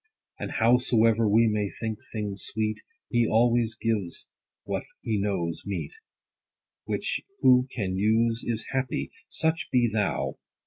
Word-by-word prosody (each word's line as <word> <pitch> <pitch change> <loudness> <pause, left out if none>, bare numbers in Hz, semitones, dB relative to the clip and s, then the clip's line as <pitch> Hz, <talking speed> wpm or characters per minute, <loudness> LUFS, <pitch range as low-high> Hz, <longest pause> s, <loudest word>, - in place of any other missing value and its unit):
And - - -4
howsoever 115 -2 +3
we 115 +3 +5
may 105 -2 0
think 110 0 -5
things 105 -3 -3
sweet, 110 0 -2 0.3
He 120 -2 +3
always 115 0 +3
gives 105 -6 -2 0.4
what - - -2 0.2
he 110 -2 -1
knows 85 -5 -1
meet; 100 -1 -4 0.9
Which - - -1 0.2
who 125 0 +6
can 95 -7 -2
use 115 +3 +2
is 115 -1 -2
happy: 130 -1 -2 0.2
Such 160 +1 0
be 125 -1 +4
thou. 105 -3 -1
110 Hz, 130 wpm, -27 LUFS, 105-120 Hz, 0.9 s, who